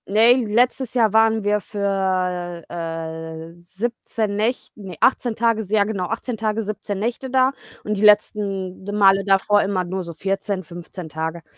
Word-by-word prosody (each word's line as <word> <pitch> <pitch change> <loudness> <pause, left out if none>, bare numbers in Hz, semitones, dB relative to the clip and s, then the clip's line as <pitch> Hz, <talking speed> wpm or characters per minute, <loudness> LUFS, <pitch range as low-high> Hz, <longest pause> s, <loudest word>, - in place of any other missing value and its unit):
Ne, 220 +4 +6
letztes 245 +3 +1
Jahr 225 -4 +3
waren 220 -1 +4
wir 210 0 +1
für, 185 -4 -2
äh, 165 -1 -6
17 205 +3 -4
Näch 225 +5 -1
ne, 190 -5 -9
18 245 -3 +2
Tage, 230 -1 +1
s 200 - -9
ja 210 -1 +4
genau, 200 -3 -2
18 225 +4 -4
Tage, 220 0 -1
17 205 -1 -4
Nächte 240 +5 -3
da 260 0 +3 0.3
und 210 - -2
die 200 - -4
letzten 200 -3 +2
d 205 - -5
Male 195 -1 +5
davor 205 +1 +3
immer 195 -2 0
nur 185 +1 -4
so 170 -1 -8
14, 195 +3 -2
15 175 +1 -9
Tage. 160 +1 -4
200 Hz, 165 wpm, -21 LUFS, 180-220 Hz, 0.3 s, Ne